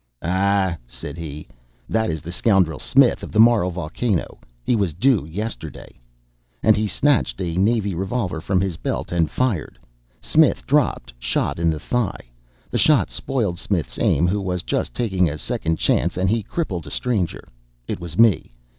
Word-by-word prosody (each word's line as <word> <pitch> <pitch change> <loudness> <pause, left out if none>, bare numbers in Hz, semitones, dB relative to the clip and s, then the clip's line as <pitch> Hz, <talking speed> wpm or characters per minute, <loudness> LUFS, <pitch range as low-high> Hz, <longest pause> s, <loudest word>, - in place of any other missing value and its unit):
"Ah," 95 0 +1
said - - -8
he, 75 -3 -7 0.4
"that 110 0 0
is 80 -2 -3
that 85 - -6
scoundrel 90 -4 +2
Smith, 135 -2 +3
of - - -8
the 110 - 0
Moral 115 -5 +5
Volcano 90 +3 -2 0.2
he 125 - +2
was 100 -7 0
due 105 - +2
yesterday." 80 - -6 0.6
And 110 - +6
he 105 +1 0
snatched 130 +1 +1
a 85 -3 -2
navy 100 +1 +1
revolver 95 -1 -2
from 95 +1 +1
his 95 -4 -2
belt - - -3
and 85 -3 +1
fired 125 -11 -1 0.4
Smith 155 -1 +3
dropped, 125 - +1
shot - - -1
in 85 0 +2
the 80 -1 -1
thigh. 105 - -2 0.4
The - - 0
shot - - +4
spoiled 105 -10 -1
Smith's 90 -7 -2
aim, 80 - +3
who 100 +3 0
was 90 -2 -2
just - - -2
taking 95 -7 +1
a 75 - -5
second 80 +1 -2
chance - - +1
and 95 +1 +1
he 115 0 +1
crippled 95 - -4
a - - -6
stranger. 105 - -2 0.4
It - - -3
was 85 -1 -7
me. 105 - +3
95 Hz, 170 wpm, -22 LUFS, 85-110 Hz, 0.6 s, And